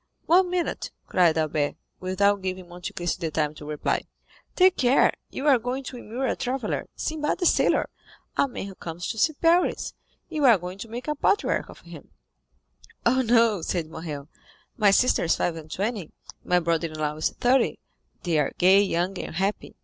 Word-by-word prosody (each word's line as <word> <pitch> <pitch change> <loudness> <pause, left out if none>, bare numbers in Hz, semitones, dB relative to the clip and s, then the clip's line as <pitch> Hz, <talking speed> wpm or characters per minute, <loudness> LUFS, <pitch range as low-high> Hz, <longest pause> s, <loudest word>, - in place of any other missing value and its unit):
"One 360 +2 +4
minute," 360 -1 -2 0.2
cried 170 -3 +3
Albert, 155 -2 0 0.2
without 200 +2 +1
giving 185 -1 -4
Monte 175 +1 -7
Cristo 175 -1 -2
the - - -2
time 150 -1 -1
to 150 - -11
reply. 150 0 -1 0.5
"Take 370 0 +5
care, 255 +1 +4 0.2
you 275 - -5
are 275 -4 +5
going 250 +4 -3
to 255 -1 -7
immure 240 +3 -4
a - - 0
traveller, 260 +1 -3
Sinbad 305 -1 -2
the 355 - -1
Sailor, - - +3 0.5
a - - +3
man 250 - -6
who 200 - -8
comes 175 -1 -7
to 225 - -4
see 315 - +3
Paris; 335 +4 +2 0.3
you 310 -3 -3
are 235 -5 +7
going 180 +2 -8
to 230 - -6
make 240 +4 -6
a 300 - +1
patriarch 405 +9 +1
of - - -13
him." - - -12 1.0
20255m 235 - +5
"Oh, 260 - +2
no," 230 -5 +3
said 160 -2 -3
Morrel; 155 -3 -6 0.5
"my 210 -2 +4
sister 225 0 +3
is 165 - +3
five 170 - -1
and 160 -1 -9
twenty, 200 -1 -3 0.3
my 180 0 +3
brother 165 -1 0
in 155 -1 -9
law 150 -1 -1
is 155 - 0
thirty, 255 +2 +3 0.5
they 170 -4 +1
are 145 - 0
gay, 190 +2 +6
young, 185 -1 -1
and - - -6
happy. 195 +4 -2
195 Hz, 190 wpm, -25 LUFS, 165-255 Hz, 1.0 s, are